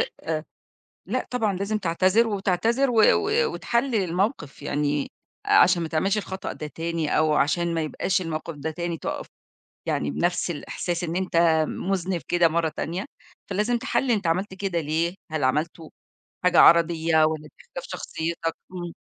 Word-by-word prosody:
آآ 470 - +2 1.0
لأ - - -2
طبعًا، 220 -5 0
لازم 200 +3 -1
تعتذر، 190 +4 +2
وتعتذر، 220 +6 +1
و 225 -2 +4
و 440 +3 +1
وتحلل 235 +1 0
الموقِف 180 - -2
يعني، 145 0 -1 0.3
عشان 180 -1 +5
ما 165 - -2
تعملش 190 +7 0
الخطأ 190 -2 -4
ده 150 - -6
تاني، 165 +1 -2
أو 155 -1 +3
عشان 170 +4 +1
ما 165 - 0
يبقاش 180 +4 -1
الموقِف 165 -1 -4
ده 150 +2 -4
تاني، 170 +1 -3
تقف - - -5 0.6
يعني 75 - -1
بنَفْس 175 - 0
الإحساس 170 +3 -4
إن 170 0 -3
أنت 185 -1 -2 0.3
مذنب 185 -2 -2
كده 175 -1 +4
مرّة 165 0 0
تانية، 170 +5 -4 0.4
فلازم 210 +5 +1
تحلل 260 +1 0
أنت 205 -6 +1
عملت 185 +4 0
كده 190 -3 -2
ليه، 165 +4 -1 0.2
هل 155 -3 -1
عملته 155 +4 -1 0.5
حاجة 180 - +4
عرضيّة، 165 -1 +5
والّا 155 -1 -1
دي - - -21
اختلاف - - -8
شخصيتك؟ 165 0 -3 0.2
إمم. 175 -2 -6
175 Hz, 155 wpm, -25 LUFS, 160-195 Hz, 1.0 s, عشان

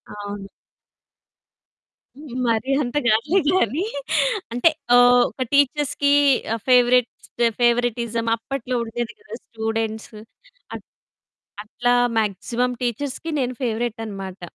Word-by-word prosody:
అవును. 205 -1 -7 2.0
మరి 230 +4 0
అంత 245 +2 -5
కాదులే 270 - +3
గాని. 315 - +1 0.7
అంటే 245 +7 +4 0.3
ఓహ్! 245 0 +6
ఒక 260 - -6
టీచర్స్‌కి 285 0 +2 0.6
ఫేవరేట్స్ 250 -1 +3 0.3
ఫేవరిటిజం 235 -1 +1
అప్పట్లో 250 +1 -5
ఉండేది 235 +1 -4
కదా! 435 - -11
స్టూడెంట్సు. 220 -1 -4 0.6
అట్ - - -9 0.8
అట్లా 245 +3 0 0.2
మాక్సిమం 235 +4 -1
టీచర్స్‌కి 275 +6 -3
నేను 250 0 -2
ఫేవరేట్ 230 0 -2
అనమాట. 195 -3 -8
240 Hz, 90 wpm, -22 LUFS, 220-250 Hz, 2.0 s, ఓహ్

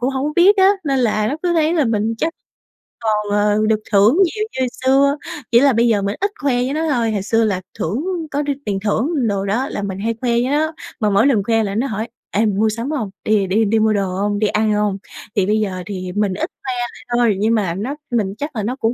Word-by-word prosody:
cũng 250 +2 0
hổng 270 +1 -2
có 300 - -2
biết 390 +4 +6
á, 380 0 +6 0.2
nên 275 -3 +1
là 215 -3 +1
nó 285 - -2
cứ 355 - +1
thấy 320 0 +2
là 310 - +2
mình 225 -1 0
chắc 330 - 0 0.7
còn, 210 -2 -1
ờ, 205 0 +2
được 215 -1 +2
thưởng 205 +7 +5
nhiều 425 +5 -2 0.2
như 260 - +2 0.2
xưa, 280 +2 +4 0.4
chỉ 235 - +7
là 280 0 +5
bây 235 +1 +3
giờ 210 -3 +2
mình 200 +1 -2
ít 400 +1 +1
khoe 280 -3 +1
với 250 +2 0
nó 320 +1 -1
thôi. 235 -5 +1
Hồi 200 - -1
xưa 225 +3 +2
là 200 -4 0 0.2
thưởng 220 - -2 0.3
có 290 +1 -1
r - - 0 0.2
tiền 195 -2 -1
thưởng 240 - 0
đồ 200 -1 -1
đó 235 +8 0
là - - -4
mình 195 -1 -4
hay 230 +3 -1
khoe 245 -2 0
với 240 +2 +1
nó, 310 +2 +1 0.3
mà 210 -2 +2
mỗi 200 +5 +4
lần 230 -8 +3
khoe 225 +1 +2
là 200 -1 -3
nó 240 +6 0
hỏi: 220 -1 -3 0.2
"Ê, - - -2
mày 205 -2 0
mua 220 +1 +2
sắm 230 +5 -3
hông? 245 -10 -2
Đi 215 -2 +2
đi 205 +4 +2
đi 220 +2 +2
mua 220 0 +3
đồ 200 -2 0
hông, 205 +1 0
đi 215 - +2
ăn 215 +1 +1
hông?". 210 -2 0 0.4
Thì 195 - +2
bây 215 +2 +2
giờ 190 -3 -2
thì 185 -3 -5
mình 205 -2 +1
ít 190 - -3
khoe 265 - -4 0.2
lại - - -15
thôi 235 -4 +3
nhưng 225 +3 +2
mà 190 -6 0
nó 230 +10 -3 0.2
mình 205 -5 0
chắc 290 -2 -5
là 215 - -2
nó 240 +5 -2
cũng 230 -2 0
220 Hz, 265 wpm, -19 LUFS, 205-265 Hz, 0.7 s, chỉ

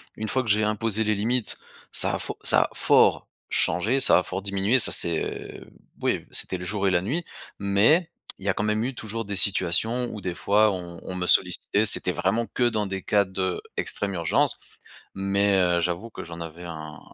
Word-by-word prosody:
Une 110 0 -7
fois 130 - -2
que 115 - -8
j'ai 105 +1 +1
imposé 110 +1 -1
les 110 0 -1
limites, 115 +3 -3 0.3
ça - - +8
a - - -6
fo - - -7
ça - - +3
a - - -7
fort - - +1 0.2
changé, 105 +11 0
ça 130 - +6
a - - -5
fort 95 +2 -6
diminué, 100 +5 -1
ça - - +9
c'est 85 -2 +3 0.4
oui - - -3
c'était 95 - 0
le 90 - -10
jour 100 +1 -3
et - - 0
la 90 -1 0
nuit. 150 - -5 0.3
Mais 110 - +1 0.3
il 95 - -13
y - - -1
a - - +1
quand 105 - -5
même 105 +1 -2
eu 130 - -5
toujours 115 0 -6
des 100 0 -6
situations 105 +6 +3
où 105 - -9
des 90 -2 -6
fois 105 +5 +1
on 85 -2 -9
on 90 - -8
me 90 -1 -4
sollicitait, 95 +4 +2
c'était 95 -3 +6
vraiment 95 +7 -2
que 125 - -4
dans 110 -2 -3
des 95 -1 -6
cas 100 +1 0
d'extrême 95 +1 -3
urgence, 85 -3 -1 0.6
mais, 100 0 0
heu, 90 -2 0
j'avoue 90 +6 -5
que - - -10
j'en 85 0 -11
avais 85 +1 -10
un 80 -3 -10
100 Hz, 205 wpm, -23 LUFS, 90-110 Hz, 0.6 s, ça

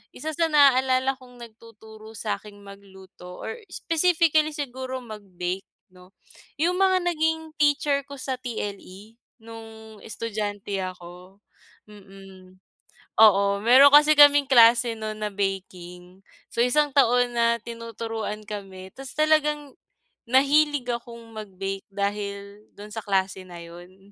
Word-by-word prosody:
isa 315 +1 -5
sa 330 +1 +1
naaalala 265 -2 +3
kong 250 -1 -16
nagtuturo 220 -1 -14
sa'king 210 -1 -6
magluto, 190 -2 -13
or - - -6 0.2
specifically 320 -2 +1
siguro 260 -2 -5
magbake 195 -4 -6 0.3
'no? 180 0 -19 0.5
Yung 355 +3 +1
mga 375 -1 +3
naging 320 -2 -1
teacher 290 -1 +2
ko 280 - -9
sa 260 -1 -4
TLE 210 -3 -8 0.3
nung 225 -1 -12
estudyante 205 -3 -5
ako. 180 +1 -10 0.5
Mm. 195 -2 -16 0.6
Oo, 200 -2 +5
meron 260 +6 +7
kasi 300 +1 +7
kaming 290 -1 +7
klase 235 -2 +5
nun 215 -1 -6
na 210 - -2
baking. 185 -2 -6 0.3
So, 235 - -1
isang 290 +3 +1
taon 245 -2 +3
na 235 0 +2
tinuturuan 225 -2 -6
kami. 190 -2 -8
Ta' 270 - -9
s, 270 - -9
talagang 300 -2 +1 0.5
nahilig 280 +1 +2
akong 235 -1 -8
magbake 195 -2 -7
dahil 200 0 -5
dun 205 +1 -11
sa 220 0 -6
klase 190 -1 -1
na 175 -1 -10
yun. 180 +4 -15
225 Hz, 120 wpm, -24 LUFS, 200-270 Hz, 0.6 s, meron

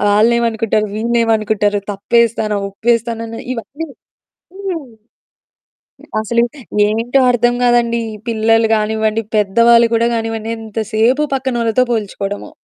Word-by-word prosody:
ఆళ్ళేమనుకుంటారు? 225 -1 +2
వీళ్ళేమనుకుంటారు 220 -3 +1
తప్పేస్తానా 220 0 +1
ఒప్పేస్తానాని 230 +1 -2
ఇవన్నీ 285 +7 -6 0.7
హ్మ్. 375 -7 -5 1.3
అసలు 235 +2 +1 0.5
ఏంటో 230 +5 +1
అర్థం 240 0 +2
గాదండీ! 240 -1 +2
ఈ - - -7
పిల్లలు 225 0 +2
కానివ్వండి, 220 +1 0
పెద్దవాళ్ళు 230 +3 +4
గూడా 230 +1 +2
గానివ్వండి, 225 -1 -3
ఎంతసేపు 225 +4 0
పక్కనోళ్ళతో 255 -3 +1
పోల్చుకోవడము, 205 -2 -3
225 Hz, 90 wpm, -16 LUFS, 215-235 Hz, 1.3 s, పెద్దవాళ్ళు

